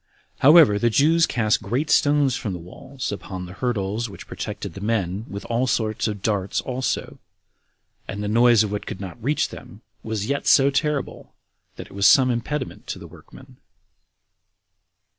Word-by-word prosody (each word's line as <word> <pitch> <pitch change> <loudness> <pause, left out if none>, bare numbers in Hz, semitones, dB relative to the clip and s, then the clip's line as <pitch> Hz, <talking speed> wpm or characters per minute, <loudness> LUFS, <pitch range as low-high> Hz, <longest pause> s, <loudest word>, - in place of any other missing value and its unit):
However, 145 -8 +7
the 120 - +2
Jews 160 +8 +3
cast 110 -3 +1
great 130 +10 -2
stones 145 -3 +3
from 105 - -4
the - - -4
walls 125 +10 -7
upon 95 -2 -6
the 90 - -10
hurdles 110 +1 -2
which 95 - -11
protected - - -6
the 95 - -9
men, 105 -2 -1
with 100 +1 -7
all 120 +2 0
sorts 110 -3 0
of 105 -3 -5
darts 100 -3 -1
also; 130 0 -3 0.9
and 105 +1 -5
the - - -2
noise 115 +1 +5
of 105 - -4
what 105 - -4
could - - -6
not 100 +3 -9
reach 145 +4 0
them - - -12 0.2
was 110 -2 -3
yet 140 +3 -2
so 140 0 +5
terrible, 150 0 -2 0.4
that - - -8
it - - -16
was 100 0 +3
some 130 +2 +6
impediment 130 +4 -4
to - - -4
the - - -11
workmen. - - -15
115 Hz, 170 wpm, -23 LUFS, 100-135 Hz, 0.9 s, However